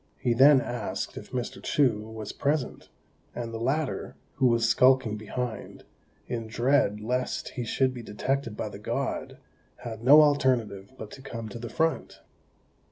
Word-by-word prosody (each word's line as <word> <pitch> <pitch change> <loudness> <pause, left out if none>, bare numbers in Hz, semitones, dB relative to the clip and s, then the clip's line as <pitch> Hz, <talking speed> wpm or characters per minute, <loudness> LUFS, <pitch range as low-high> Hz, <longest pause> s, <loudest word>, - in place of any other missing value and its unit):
He 120 - +1
then 135 +2 +7
asked 120 0 -4
if - - -9
Mr. 125 -2 -4
Chou 125 -7 +2
was 110 -2 -6
present; 145 -1 -2 0.5
and 115 -1 -5
the 115 - -4
latter, 135 +5 -2 0.2
who 130 - +4
was 115 -1 +3
skulking 125 -2 +4
behind, 110 +2 -5 0.4
in 115 -2 -4
dread 120 -2 +2
lest 125 +3 -2
he 125 - -5
should 130 +3 +1
be 125 - -7
detected 115 +2 -3
by - - -3
the - - -10
God, - - -3 0.5
had 115 -2 -7
no 145 +5 +8
alternative 125 -9 +1
but 110 -1 -8
to 135 - -11
come 115 -4 -7
to 110 - -8
the 120 0 -6
front. 160 +8 -1
120 Hz, 160 wpm, -27 LUFS, 115-135 Hz, 0.5 s, no